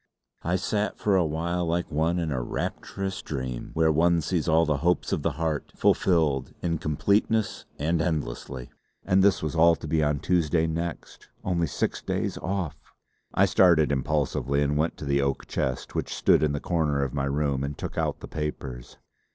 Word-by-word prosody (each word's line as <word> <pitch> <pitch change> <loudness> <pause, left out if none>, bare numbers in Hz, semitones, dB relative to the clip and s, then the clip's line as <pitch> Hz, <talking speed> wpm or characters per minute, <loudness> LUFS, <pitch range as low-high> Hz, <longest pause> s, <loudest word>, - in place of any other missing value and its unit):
I 85 +2 0
sat 105 +3 -1
for 100 -2 +2
a 90 - +4
while 85 +2 -1
like 85 0 -1
one 80 +3 +1
in 85 -3 -1
a 65 -3 -1
rapturous 95 +9 -4
dream, 65 -4 -4
where 80 0 +4
one 85 +2 +3
sees 85 -1 -1
all 80 0 +4
the 75 -2 +1
hopes 85 +3 +1
of - - 0
the 80 +1 0
heart 80 -1 -2
fulfilled 75 -7 +2
in 85 -2 0
completeness 100 +7 +1
and 80 +3 0
endlessly. 65 -6 -3 0.3
And 95 +1 +4
this 100 -4 +3
was 75 - -2
all 85 +1 +6
to 80 - -8
be 80 +1 +1
on 75 -1 +2
Tuesday 85 -2 +2
next 85 +1 -5
Only 85 -3 0
six - - -2
days - - -2
off!... 95 -6 -3 0.6
I - - +5
started 80 -5 +4
impulsively 70 0 0
and 70 0 0
went 80 +3 0
to - - -7
the 70 0 +2
oak 70 -1 -1
chest 65 -2 -3
which - - -3
stood - - +4
in 75 -2 +2
the 70 - -1
corner 75 -5 0
of 65 - -3
my 70 -1 -1
room 70 -1 0
and 70 +1 -4
took - - -5
out - - -1
the - - -7
papers. 65 -5 -5
80 Hz, 185 wpm, -26 LUFS, 70-85 Hz, 0.6 s, all